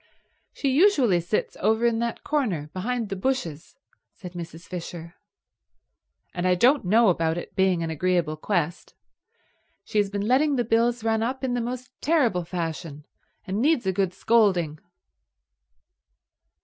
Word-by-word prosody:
"She 275 - -2
usually 270 - +4
sits 175 +5 -2
over 220 +2 +2
in 230 -1 +2
that 235 -1 -3
corner 200 - -1
behind 230 +3 -2
the 195 - -3
bushes," 185 - -3 0.4
said 180 -4 -10
Mrs. 170 -1 -8
Fisher. 170 -1 -7 1.2
"And 180 0 -1
I 180 - +4
don't 255 +10 +4
know 220 +4 +5
about 165 -2 +1
it 175 - -7
being 190 -3 +2
an 165 - -3
agreeable 170 -1 0
quest. 175 0 -2 0.9
She 215 - -1
has 205 -1 +1
been 200 +1 -3
letting 280 +4 +3
the 245 - +1
bills 230 +1 +1
run 225 -1 +1
up 260 +4 -2
in 255 -2 0
the 245 - 0
most 250 +2 -5
terrible 245 - +2
fashion, 165 -3 -5 0.4
and 195 +3 -2
needs 285 -4 +2
a 190 - +1
good 190 -1 0
scolding." 185 -9 +2
200 Hz, 150 wpm, -25 LUFS, 175-240 Hz, 1.2 s, know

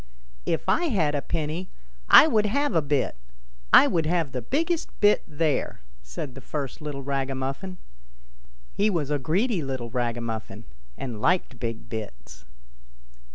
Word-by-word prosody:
" - - -29
If - - -23
I 350 - +2
had 180 - +1
a 145 - 0
penny 165 +4 -3 0.4
I - - +10
would 215 -8 +2
have 285 +6 0
a 165 - +3
bit; 140 - 0 0.5
I - - +9
would 165 -3 +1
have 165 -4 0
the 125 - -3
biggest 325 - -1
bit 210 0 +5
there! 155 -1 -1
" - - -24
said 60 - -7
the 135 - -10
first 145 +2 -5
little 145 -2 -5
ragamuffin. 135 +6 -3 1.0
He 210 +2 +2
was 155 -7 -1
a 145 - +1
greedy 185 - +1
little 130 -4 -4
ragamuffin, 115 -2 -3 0.3
and 120 -5 -5
liked 180 +7 +1
big 115 -1 -4
bits. 80 - -8
145 Hz, 155 wpm, -26 LUFS, 125-180 Hz, 1.0 s, I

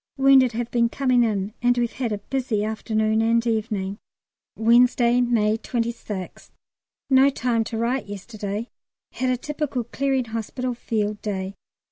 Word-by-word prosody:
Wounded 270 -2 +5
have 235 +1 -3
been 235 -1 +2
coming 255 -1 +2
in, 205 -2 -1
and 245 0 +3
we've 240 -1 +1
had 245 -4 -3
a 210 - -1
busy 240 -2 -2
afternoon 220 0 0
and 230 +1 +2
evening. 215 -3 -2 0.6
Wednesday, 240 +1 +4
May 225 -3 +2
26th. 230 -6 -4 0.6
No 265 +1 +6
time 245 -4 0
to 225 - -4
write 240 +1 -1
yesterday; 205 +2 -5 0.4
had 255 0 -1
a 250 - +1
typical 295 -2 -3
Clearing 265 +2 -1
Hospital 230 +3 -3
Field 215 -3 -2
Day. 195 -2 -3
235 Hz, 140 wpm, -23 LUFS, 215-250 Hz, 0.6 s, No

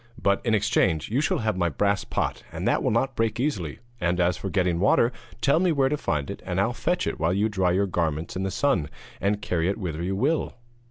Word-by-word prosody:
But, 100 -2 +1
in 115 -3 +2
exchange, 100 -6 +1
you 130 +5 +2
shall - - +1
have 110 -2 +1
my 85 -2 +1
brass 100 +6 +1
pot, - - -2
and - - -3
that - - +2
will - - +1
not 125 +3 0
break 115 0 0
easily; 100 - -1 0.2
and 90 0 0
as 90 0 +3
for 95 - -5
getting 90 -2 +1
water, 115 +5 +4 0.3
tell 140 +3 +4
me 180 -1 +3
where 135 -3 +2
to 150 - +1
find 75 - -2
it, - - -8
and - - -2
I'll - - +1
fetch - - 0
it - - -3
while 80 +3 +1
you 105 +3 +2
dry 95 -3 +1
your 95 +3 +2
garments 80 -4 -2
in 95 - -2
the 95 - -1
sun, 95 - +1 0.3
and 100 +1 0
carry 85 0 0
it 100 - -1
whither 85 -6 -4
you 95 +3 -1
will.' 145 +10 0
100 Hz, 240 wpm, -25 LUFS, 85-115 Hz, 0.3 s, water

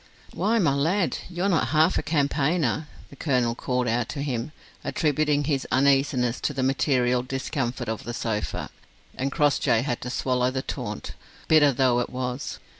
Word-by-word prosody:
"Why, 225 +3 +1
my 165 -10 +3
lad, 165 +7 +1
you're 180 +2 -1
not 175 -5 +2
half 160 +3 +3
a - - 0
campaigner," 150 -1 0 0.2
the - - -11
colonel 125 -5 +1
called 125 +1 -1
out 115 0 0
to 140 - -4
him; 125 -1 -3 0.3
attributing 150 -2 +1
his 140 -2 -1
uneasiness 135 -2 +2
to 145 - -1
the 130 - 0
material 130 -2 +2
discomfort 130 -1 -3
of 110 -1 -3
the 120 +1 -5
sofa: 105 -3 -3 0.4
and 135 +2 -2
Crossjay 145 -6 +2
had 125 -4 -2
to 125 - -5
swallow 125 0 0
the 130 0 -3
taunt, - - -5 0.3
bitter 150 -3 +6
though 125 -1 +2
it 120 - -2
was. 125 +1 -4
135 Hz, 165 wpm, -25 LUFS, 125-150 Hz, 0.4 s, bitter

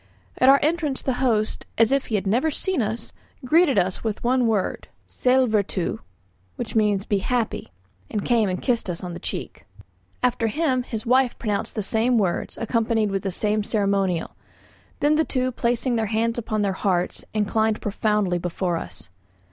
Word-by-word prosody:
At 255 - +6
our 275 +1 +7
entrance 305 -3 0
the 265 - 0
host, 220 -5 0
as 225 +1 +4
if 275 -1 +1
he 220 - -1
had 200 - -1
never 240 +11 +2
seen 355 +1 0
us, 220 +1 -3 0.3
greeted 310 -2 +4
us 185 -1 0
with 220 -2 -2
the 250 +2 +2
word 225 -5 0 0.2
"Sællvertu," 220 -8 +1 0.6
which 235 -2 -5
means 210 -2 +2
"be 205 - +1
happy," 235 - -2 0.4
and 210 -2 -3
came 230 -5 +2
and 180 -1 -2
kissed 235 -6 0
us 175 0 -3
on 180 -1 -5
the - - -7
cheek. - - -6 0.6
After 245 -2 +2
him 260 +2 +1
his 230 -2 -5
wife 255 +1 +3
pronounced 210 -3 -2
the 215 - -1
same 230 +4 +2
words, 190 -5 -1
accompanied 225 -2 +1
with 195 -1 -1
the 195 - -2
same 210 +3 +1
ceremonial; 200 -5 0 0.7
then 300 +1 +3
the 320 - +4
two 255 -3 -1
placing 240 0 0
their 220 -1 0
hands 230 +2 0
upon 215 -2 -1
their 195 -1 +1
hearts, 185 -2 -1
inclined 215 +1 +1
profoundly 205 -3 0
before 175 0 -2
us. - - -8
220 Hz, 170 wpm, -23 LUFS, 200-250 Hz, 0.7 s, our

